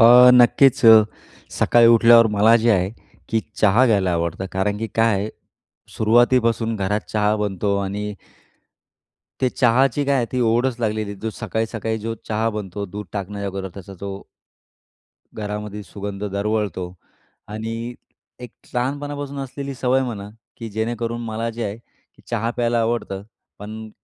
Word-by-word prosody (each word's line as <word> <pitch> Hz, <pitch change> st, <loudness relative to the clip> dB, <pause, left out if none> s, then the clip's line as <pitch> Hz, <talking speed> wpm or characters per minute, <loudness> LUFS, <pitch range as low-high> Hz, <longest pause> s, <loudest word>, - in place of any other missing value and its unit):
अ, 125 Hz, +2 st, +9 dB
नक्कीच. 125 Hz, +2 st, +5 dB, 0.7 s
सकाळी 120 Hz, -1 st, +4 dB
उठल्यावर 115 Hz, 0 st, +7 dB
मला 105 Hz, +2 st, +4 dB
जे 115 Hz, 0 st, +2 dB
आहे 95 Hz, -3 st, +2 dB, 0.4 s
की 115 Hz, -, +1 dB, 0.2 s
चहा 105 Hz, +5 st, +5 dB
घ्यायला 100 Hz, -6 st, +2 dB
आवडतं; 85 Hz, +2 st, -2 dB
कारण 100 Hz, +2 st, -1 dB
की 115 Hz, -, -3 dB
काय 115 Hz, -1 st, +3 dB
आहे, 100 Hz, +2 st, -2 dB, 0.7 s
सुरुवातीपासून 115 Hz, 0 st, +2 dB
घरात 105 Hz, +1 st, -1 dB
चहा 105 Hz, 0 st, +1 dB
बनतो 100 Hz, -1 st, -1 dB
आणि 105 Hz, +2 st, -4 dB, 1.3 s
ते 130 Hz, -, +3 dB
चहाची 130 Hz, +3 st, +2 dB
काय 140 Hz, 0 st, +2 dB
आहे 125 Hz, -3 st, +1 dB
ती 125 Hz, -, -1 dB
ओढच 120 Hz, +2 st, +1 dB
लागलेली 110 Hz, -2 st, -2 dB
आहे. 100 Hz, -, -10 dB
जो 110 Hz, -, -3 dB
सकाळी-सकाळी 110 Hz, +1 st, -3 dB
जो 115 Hz, +1 st, -4 dB
चहा 110 Hz, +1 st, 0 dB
बनतो, 100 Hz, -2 st, -5 dB
दूध 105 Hz, +3 st, -7 dB
टाकण्याच्या 100 Hz, 0 st, -4 dB
अगोदर 95 Hz, 0 st, -5 dB
त्याचा 100 Hz, 0 st, -10 dB
जो 100 Hz, 0 st, -6 dB, 1.1 s
घरामध्ये 105 Hz, 0 st, -5 dB
सुगंध 100 Hz, +1 st, -7 dB
दरवळतो. 100 Hz, -3 st, -2 dB, 0.5 s
आणि, 115 Hz, +3 st, -5 dB, 0.5 s
एक 125 Hz, -2 st, -8 dB, 0.2 s
लहानपणापासून 140 Hz, +2 st, -3 dB
असलेली 135 Hz, +1 st, -6 dB
सवय 130 Hz, +1 st, +1 dB
म्हणा 105 Hz, -6 st, -5 dB, 0.3 s
की 115 Hz, -, -7 dB
जेणेकरून 115 Hz, +2 st, -3 dB
मला 115 Hz, +1 st, -3 dB
जे 115 Hz, 0 st, -5 dB
आहे 100 Hz, +1 st, -4 dB
की, 115 Hz, -, -29 dB
चहा 115 Hz, -1 st, -1 dB
प्यायला 120 Hz, -1 st, +1 dB
आवडतं 115 Hz, -4 st, -2 dB, 0.4 s
पण 110 Hz, +1 st, -8 dB
110 Hz, 140 wpm, -21 LUFS, 100-120 Hz, 1.3 s, अ